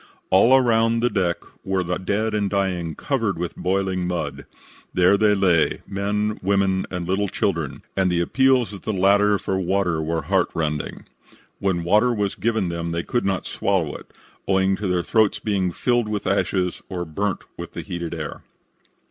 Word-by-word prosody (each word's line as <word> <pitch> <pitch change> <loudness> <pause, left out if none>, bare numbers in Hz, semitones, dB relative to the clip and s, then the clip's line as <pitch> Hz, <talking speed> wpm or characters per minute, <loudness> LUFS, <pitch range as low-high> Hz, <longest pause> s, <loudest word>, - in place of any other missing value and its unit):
All 115 +8 +6
around 115 -3 +3
on - - 0
the 120 - +3
deck 90 -4 +1 0.3
were 95 -1 0
the 90 +1 -2
dead 105 +4 -1
and 105 -2 0
dying 90 -5 -1
covered 115 - -1
with 85 0 -4
boiling 95 -1 -1
mud. 90 -2 -4 0.5
There 90 +2 +5
they 105 0 +3
lay, 90 -5 +2
men, 105 +2 -1
women 95 -1 +1
and 90 -2 -4
little 100 +2 +1
children, 85 - -2
and 95 -2 +2
the 85 - +1
appeals 130 +5 +2
of 100 - -8
the 110 - -2
latter 100 +2 +4
for 95 -1 -2
water 90 -3 0
were 80 0 -2
heart 95 +3 +1
rending. 75 -2 -3 0.5
When 95 -4 0
water 105 +8 +4
was 105 -4 -1
given 110 -5 0
them 85 0 -3
they 85 0 -2
could 120 - -1
not 95 -1 -1
swallow 95 -7 0
it, - - -11 0.4
owing 95 0 +3
to 105 - -3
their 90 -1 +1
throats 110 +1 +2
being 100 -4 0
filled 120 +4 +1
with 105 -2 -3
ashes 95 -2 0
or 90 -2 -3
burnt 95 +5 -2
with - - -8
the - - -5
heated 85 -1 -5
air. 75 -2 -6
95 Hz, 180 wpm, -23 LUFS, 90-105 Hz, 0.5 s, All